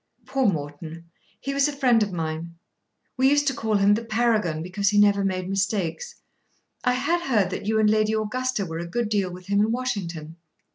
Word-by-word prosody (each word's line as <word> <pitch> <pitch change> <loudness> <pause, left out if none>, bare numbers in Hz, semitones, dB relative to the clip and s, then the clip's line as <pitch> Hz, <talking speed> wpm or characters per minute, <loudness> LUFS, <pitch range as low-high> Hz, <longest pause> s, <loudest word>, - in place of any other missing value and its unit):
"Poor 270 -2 +1
Morton. 160 0 -4 0.3
He 275 - -4
was 280 +1 +3
a - - -2
friend 250 -5 +4
of 205 -2 0
mine. 165 0 -4 0.6
We 260 +1 +4
used 290 0 +3
to 275 - +1
call 220 -3 -1
him 200 0 +4
the 225 +3 -1
Paragon 215 -8 0
because 195 +3 0
he 205 - +1
never 205 -1 +4
made 185 -2 -1
mistakes. 195 - -2 0.7
I 250 - +2
had 290 +7 0
heard 205 -7 +2
that 200 - -5
you 220 0 +2
and 215 - +4
Lady 215 0 +2
Augusta 220 0 -1
were 165 -1 -5
a 170 - -5
good 225 +5 -2
deal 200 -3 0
with 180 +1 -10
him 200 +1 +1
in 215 +2 +2
Washington." 175 -10 -4
205 Hz, 200 wpm, -24 LUFS, 180-240 Hz, 0.7 s, friend